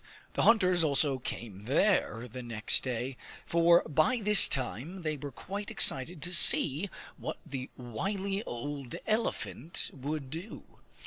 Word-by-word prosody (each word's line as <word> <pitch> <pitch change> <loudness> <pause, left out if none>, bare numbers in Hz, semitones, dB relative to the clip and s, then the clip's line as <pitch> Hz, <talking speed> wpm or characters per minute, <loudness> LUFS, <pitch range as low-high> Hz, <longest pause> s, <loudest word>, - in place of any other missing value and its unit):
The - - -1
hunters 185 -6 +4
also 140 -2 +1
came 105 -4 -7
there 135 - +1
the 125 +2 -8
next 115 -2 +1
day, 125 0 -4 0.3
for 170 +1 +4
by 155 - +1
this 210 -1 +6
time 135 - -4
they 155 -1 -2
were 145 0 -7
quite 200 - -6
excited 165 - +4
to 180 - -1
see 170 +1 +4 0.3
what - - -5
the 135 -4 -6
wily 195 - -3
old 135 +1 -6
elephant 215 - -2
would 140 0 -5
do. 170 +7 -8
150 Hz, 135 wpm, -30 LUFS, 130-185 Hz, 0.3 s, this